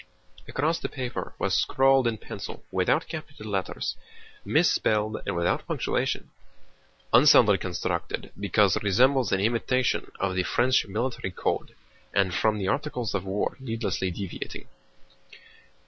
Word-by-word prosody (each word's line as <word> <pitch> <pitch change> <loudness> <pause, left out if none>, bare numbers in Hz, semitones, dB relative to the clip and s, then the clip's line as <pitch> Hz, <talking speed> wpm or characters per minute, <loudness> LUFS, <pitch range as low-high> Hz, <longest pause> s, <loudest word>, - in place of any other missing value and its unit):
Across 160 +4 0
the - - -4
paper 125 -3 -5
was - - -1
scrawled 135 -1 +3
in 115 -1 -1
pencil, - - -8
without - - +1
capital 105 0 -7
letters, 95 -2 -2 0.5
misspelled, 110 0 +2
and 100 - -1
without 85 0 0
punctuation: - - -1 0.8
"Unsoundly - - +7
constructed - - -3
because 100 -1 +2
resembles 125 +6 +3
an 95 - +2
imitation 120 +3 0
of 95 -1 0
the 95 - +1
French 125 +6 +2
military 115 0 -2
code 90 - -3 0.4
and 95 -2 +2
from 110 +2 +2
the 95 -2 -2
Articles 125 -1 -2
of 100 -1 -2
War 95 +2 -1
needlessly 115 -6 -2
deviating." 90 0 -6
110 Hz, 125 wpm, -26 LUFS, 95-125 Hz, 0.8 s, Unsoundly